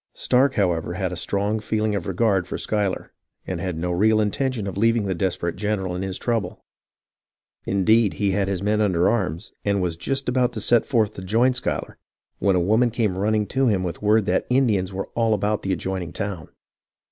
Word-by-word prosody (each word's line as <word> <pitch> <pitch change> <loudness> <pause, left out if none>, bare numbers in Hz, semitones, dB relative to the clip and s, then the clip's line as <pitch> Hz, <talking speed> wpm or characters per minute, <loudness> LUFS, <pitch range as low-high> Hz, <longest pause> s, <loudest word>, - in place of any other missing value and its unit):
Stark, 130 +2 +2
however, 85 -4 0
had 95 -1 -2
a - - -4
strong 100 +4 -1
feeling 110 0 -1
of 100 -4 -3
regard 95 -2 +1
for - - -4
Schuyler, 105 -3 -2 0.3
and - - -4
had 90 -3 -3
no 90 +2 -2
real 110 +5 +3
intention 110 +2 -1
of 95 - -4
leaving 115 +1 +2
the 95 - 0
desper 85 -1 -1
ate 85 - -7
general 95 -3 -2
in 90 - -3
his 95 -1 -3
trouble. 115 -3 -2 1.0
Indeed, 105 +2 +3
he 100 -2 0
had 100 0 0
his 95 -1 -2
men 105 +1 +1
under 90 -4 +2
arms, 90 -7 -1
and 100 -1 +1
was 90 -3 -1
just 135 +10 -2
about 125 -1 +1
to 110 - -4
set 120 +2 +3
forth 110 -5 +1
to - - -8
join 115 +7 +2
Schuyler, 125 - -3 0.4
when 100 -2 +2
a - - +3
woman 110 +7 +3
came 110 -5 -1
running 105 +2 +1
to 135 0 +1
him 100 -5 +1
with 90 -2 -4
word 105 0 +3
that - - 0
Ind 125 -1 +3
ians 95 -2 -1
were 95 +1 -4
all 115 -2 +2
about 105 +1 -1
the 95 - -2
adjoining 95 -1 -3
town. 100 -6 -4
100 Hz, 205 wpm, -23 LUFS, 95-110 Hz, 1.0 s, real